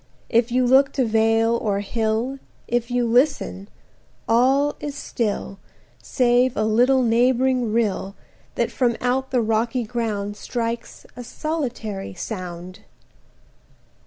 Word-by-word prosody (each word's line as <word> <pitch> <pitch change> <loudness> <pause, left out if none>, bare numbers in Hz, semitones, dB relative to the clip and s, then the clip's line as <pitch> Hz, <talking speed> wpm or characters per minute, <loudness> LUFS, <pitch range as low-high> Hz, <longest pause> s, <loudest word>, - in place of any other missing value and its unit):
If 235 +1 +2
you 255 +1 +2
look 265 +2 +5
to 260 - +1
vale 225 +1 +2
or 205 -4 -1
hill, 225 +5 -2 0.3
80 240 - -1
If 240 0 -1
you 245 0 +1
listen, 235 -5 +1 0.6
all 265 +5 +3
is 290 -1 -5
still, 210 -7 -3 0.4
Save 245 0 +2
a 215 - +1
little 245 +5 +3
neighbouring 245 0 +2
rill, 205 -3 -1 0.4
That - - 0
from 240 -3 0
out 260 +2 0
the 250 -2 +1
rocky 230 +3 0
ground 210 -3 -3
Strikes 230 +1 -4
a 245 - -7
solitary 240 - -4
sound. 180 -2 -7
235 Hz, 125 wpm, -22 LUFS, 220-255 Hz, 0.6 s, look